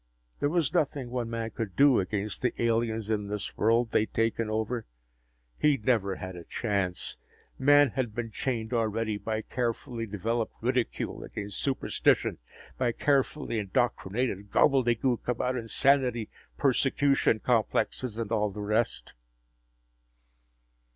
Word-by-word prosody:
There 145 - +1
was 160 -2 +1
nothing 140 -7 0
one 120 -2 -2
man 115 -1 -3
could 105 -4 -5
do 140 -3 +6
against 100 +2 -2
the 125 - -1
aliens 115 -2 0
in 105 -2 -1
this 105 0 -4
world 115 +2 +2
they - - +4
had 110 - -2
taken 115 0 +1
over. 110 +2 -2 0.7
He'd 140 -7 +2
never 100 -6 +2
had 95 0 -7
a 85 - -8
chance. 100 -3 -1 0.4
Man 145 0 +6
had 120 -4 -2
been 115 -2 -3
chained 115 0 -2
already 110 -2 0
by 110 0 -3
carefully 120 -1 -3
developed 110 +3 -2
ridicule 125 0 -1
against 100 -1 -5
superstition, 135 -2 +1 0.4
by 120 -2 +1
carefully 140 -3 0
indoctrinated 100 0 -1
gobbledegook 125 -1 +2
about 125 +1 0
insanity, 125 -1 +2 0.3
persecution 135 -3 +2
complexes, 120 0 0
and 115 -2 -3
all 105 -2 +2
the 105 +1 -8
rest. 110 +3 -1
115 Hz, 130 wpm, -28 LUFS, 110-125 Hz, 0.7 s, do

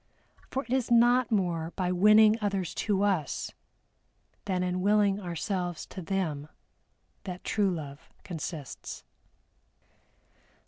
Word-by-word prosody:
For 270 - -2
it 250 - -4
is 260 -2 +1
not 240 +1 +4
more 175 -5 0
by 180 -2 0
winning 210 +4 +6
others 195 -4 -1
to 200 -2 0
us, 185 -8 0 0.9
than 185 -2 0
in 180 0 -1
willing 205 0 +3
ourselves 175 -1 -3
to 190 - -8
them 165 -6 -2 0.8
that 180 -2 -6
true 205 -3 +1
Love 150 -5 -6
consists. 160 -5 -6
190 Hz, 110 wpm, -29 LUFS, 175-210 Hz, 0.9 s, winning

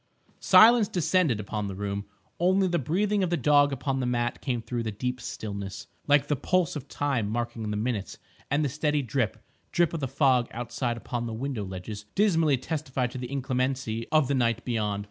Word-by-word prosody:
Silence 225 -1 +7
descended 175 - +1
upon 105 0 -3
the 95 - -5
room. 100 0 -3 0.3
Only 190 +2 +3
the 175 -1 +1
breathing 200 - +1
of 185 - +1
the 175 - +1
dog 145 +1 +4
upon 135 0 -2
the 125 - -1
mat 120 0 -1
came 125 -4 -1
through 120 +1 -3
the 110 -1 -3
deep 125 +4 -3
stillness, 100 -6 -6 0.2
like 145 -1 +4
the 145 - +1
pulse 180 +3 +1
of 145 -2 -6
time 135 -9 -1
marking 115 -1 -3
the 105 - -2
minutes; 110 -2 -2 0.3
and 145 +2 +1
the - - 0
steady 150 +1 0
drip, 125 -1 -1 0.3
drip 175 -2 +2
of 165 - -2
the 135 - -2
fog 130 -2 +3
outside 120 0 -3
upon 120 0 -4
the 115 - -4
window 125 -2 -3
ledges 100 +2 -7
dismally 165 -9 +3
testified 130 -3 -2
to 130 - -6
the 125 0 -6
inclemency 130 -4 -1
of 155 -4 +4
the 140 - 0
night 120 -3 +1
beyond. 105 -4 -1
130 Hz, 195 wpm, -27 LUFS, 115-150 Hz, 0.3 s, Silence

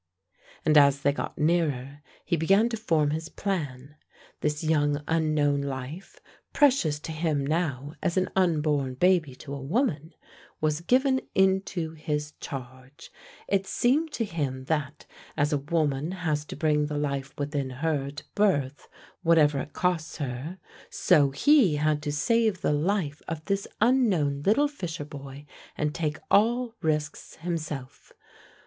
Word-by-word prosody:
And 155 -1 +6
as 140 -1 +4
they 140 - +4
got 140 - -5
nearer, 145 -4 0 0.2
he - - +1
began 195 +8 +3
to 235 - -2
form 160 -9 +1
his 160 +2 -3
plan. 150 -8 -4 0.4
This 150 +1 -1
young 145 -2 +1
unknown 155 -3 +2
life, 140 +6 -6 0.3
precious 250 - +3
to 160 - -6
him 155 -3 -1
now 145 -3 -1
as 170 - 0
an 185 - +1
unborn 150 -7 +1
baby 170 -3 +2
to 140 +1 -9
a 140 - -5
woman, 160 - -1 0.4
was 155 0 0
given 260 +7 +2
into 190 -3 +1
his 150 -1 -3
charge. 130 +3 -9 0.4
It 195 -1 0
seemed 295 +6 +1
to 230 - -1
him 140 -8 -3
that, 150 -1 -2 0.3
as 145 0 +2
a 145 - +2
woman 150 +1 -1
has 155 -5 -2
to - - -8
bring 150 -2 +1
the 150 0 -3
life 140 -2 -3
within 145 -2 -2
her 140 +1 -1
to 145 +1 -9
birth 145 -10 +1 0.3
whatever 150 -4 +4
it 145 - -6
costs 180 -3 -1
her, 140 +4 -5 0.3
so 150 -6 +4
he 195 - +4
had 150 0 +1
to 150 -1 -2
save 215 +6 +1
the - - +1
life 155 -1 -1
of 160 -1 -5
this 200 0 -1
unknown 205 - +2
little 285 +8 +4
fisher 175 - -6
boy, 140 -1 -10 0.3
and 150 0 -1
take 160 -2 -2
all 235 +3 +3
risks 155 -2 -2
himself. 155 -6 -5
155 Hz, 145 wpm, -27 LUFS, 145-180 Hz, 0.4 s, And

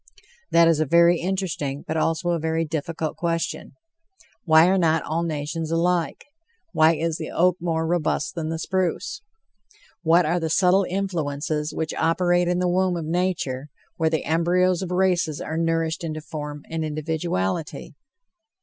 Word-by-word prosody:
That 170 0 +5
is 165 -2 +3
a 155 - +1
very 170 +2 +5
interesting, 170 -7 -3
but 160 - -2
also 165 +2 0
a 170 - 0
very 160 +1 -1
difficult 160 +1 -4
question. 170 -1 -2 0.7
Why 160 -1 +6
are 190 +1 +3
not 160 -2 +2
all 165 +2 -2
nations 160 0 -3
alike? 170 +1 0 0.5
Why 160 +1 +5
is 160 +1 -1
the 160 - -5
oak 180 +1 +2
more 165 -2 -1
robust 175 +3 0
than 160 -3 -4
the 165 - -2
spruce? 185 - -2 0.8
What 170 +1 +4
are 170 +3 +1
the 165 -1 -2
subtle 185 +2 +3
influences 155 -5 -2
which 160 -1 -3
operate 175 +2 +2
in 175 0 +1
the 180 0 +1
womb 180 0 +1
of 165 - -4
nature, 160 -5 -2 0.3
where 160 -1 +2
"the 160 -1 -1
embryos 175 +3 +2
of 185 - -4
races 180 -5 +1
are 155 - -4
nourished 165 0 0
into 155 -1 -4
form 150 -1 -7
and 160 0 -3
individuality?" 155 - -3
165 Hz, 160 wpm, -23 LUFS, 155-175 Hz, 0.8 s, Why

